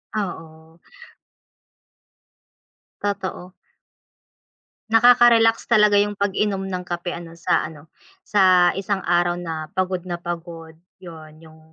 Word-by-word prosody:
Oo. 160 -5 -7 2.2
Totoo. 195 -3 -4 1.4
Nakakarelax 230 -1 +5
talaga 210 -3 +4
yung 205 0 0
pag-inom 200 0 -1
ng 185 -1 -5
kape 175 0 -4
ano 170 -1 -9
sa 170 - 0
ano, 155 0 -15 0.3
sa 185 -3 +4
isang 195 0 -3
araw 175 0 +1
na 160 -3 -6
pagod 185 -1 -1
na 175 - -3
pagod, 170 -2 -8 0.2
yun 160 -3 -12
yung 160 0 -17
180 Hz, 100 wpm, -21 LUFS, 165-205 Hz, 2.2 s, Nakakarelax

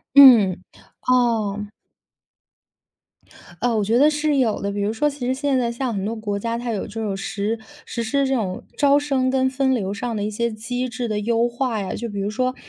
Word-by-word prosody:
嗯， 225 -10 +8 0.4
哦。 225 -5 +1 1.9
呃， 240 -1 +1
我 215 - +1
觉 225 +4 +2
得 295 +3 +6
是 300 -1 0
有 235 -5 +1
的。 200 - -1
比 205 - -3
如 205 +2 0
说， 295 +7 +1
其 275 -3 -6
实 255 - +1
现 275 0 0
在 240 -2 0
像 235 0 -3
很 195 -1 -2
多 220 +3 -2
国 205 -2 -3
家 230 +3 -2
它 240 0 -4
有 205 - -3
这 225 +2 -6
种 200 -3 -2
实 205 +2 -3 0.3
实 235 - -3
施 275 +5 +1
这 265 - +1
种 195 -7 -2
招 285 0 +4
生 270 -3 0
跟 260 0 +2
分 265 0 +1
流 200 -4 -2
上 230 +2 -3
的 205 - -2
一 210 - -1
些 235 +3 -1
机 245 +4 -3
制 240 0 -4
的 210 -1 -1
优 230 +2 +1
化 240 -3 -2
呀， 190 - -4
就 235 - -4
比 205 -2 -6
如 200 +1 -1
说 255 +3 -1
235 Hz, 230 characters per minute, -22 LUFS, 210-255 Hz, 1.9 s, 嗯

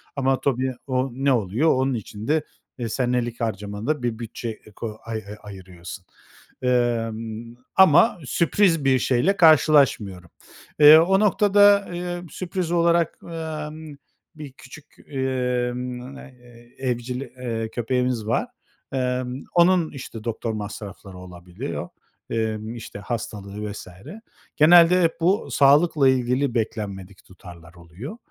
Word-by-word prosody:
Ama 135 -1 +1
tabii 130 -1 0
o 130 0 0
ne 135 +3 0
oluyor? 115 - +1
Onun 130 +1 0
için 110 -1 -7
de, 155 0 +1 0.3
eee, 120 -3 -4
senelik 120 -1 -1
harcamanda 110 +6 -3
bir 115 -2 -2
bütçe, 115 0 -6
eee, 110 -1 -10
ko 110 -2 -6
ay 115 -1 -4
ay 105 - -8
ayırıyorsun. 90 -3 -10 0.6
Emm, 115 -2 -1 0.2
ama 190 +3 +5
sürpriz 170 +1 +2
bir 130 -1 +4
şeyle 135 +12 +1
karşılaşmıyorum. 140 - +4 0.5
Eee, 150 +1 +10
o 185 +4 +4
noktada, 205 0 +4
eee, 175 0 -4
sürpriz 175 +1 -4
olarak, 170 -1 +2
emm, 155 -2 -7 0.4
bir 150 -3 -9
küçük, 135 +3 -14 0.2
emm, 125 -1 -3
eee, 120 -2 -16
evcil, 125 -1 -3
eee, 120 -4 -5
köpeğimiz 125 -1 -1
var. 115 - 0 0.5
Emm, 125 0 -2
onun, 175 -1 +4
işte, 120 -5 -9
doktor 115 0 -3
masrafları 105 -2 -8
olabiliyor, 90 -1 -7 0.4
emm, 110 0 -3
işte, 115 -3 -9
hastalığı 105 -2 -5
vs. 100 - -9 0.7
Genelde 170 +3 +6
hep 165 -1 +2
bu 190 +6 +1
sağlıkla 145 0 +4
ilgili 130 +1 +1
beklenmedik 100 -4 -4
tutarlar 85 -2 -14
oluyor. 90 - -10
125 Hz, 120 wpm, -23 LUFS, 110-150 Hz, 0.7 s, Eee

